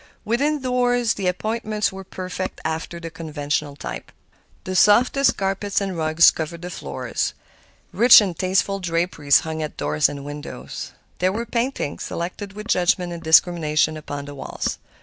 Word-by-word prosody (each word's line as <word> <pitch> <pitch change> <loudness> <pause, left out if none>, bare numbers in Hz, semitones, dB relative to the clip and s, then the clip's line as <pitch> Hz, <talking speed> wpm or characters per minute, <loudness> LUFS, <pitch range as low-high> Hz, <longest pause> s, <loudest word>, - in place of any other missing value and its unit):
Within 280 +6 0
doors 245 -2 +2
the 195 -2 -3
appointments 215 +3 -1
were 190 0 -8
perfect 185 0 -5
after 160 +2 -3
the 165 -1 -7
conventional 150 -3 -3
type. - - -7 0.5
The 185 - -4
softest 250 +8 +4
carpets 195 +1 -1
and 195 -2 -3
rugs 160 +1 +5
covered 165 +2 -6
the 180 - -5
floors; - - -3 0.6
rich 240 +1 +9
and 195 -5 -1
tasteful 190 +2 0
draperies 165 -5 +2
hung 160 0 -4
at 155 - -5
doors 75 +1 +2
and 140 -1 -7
windows. 145 - -7 0.3
There 185 +1 +2
were 230 +4 -3
paintings, 235 - -2
selected 190 +4 -5
with 210 +2 -8
judgment 180 -3 +1
and 170 - -7
discrimination, 160 -1 +3
upon 145 -2 -6
the 145 - -8
walls. 135 - -4
180 Hz, 150 wpm, -22 LUFS, 155-210 Hz, 0.6 s, rich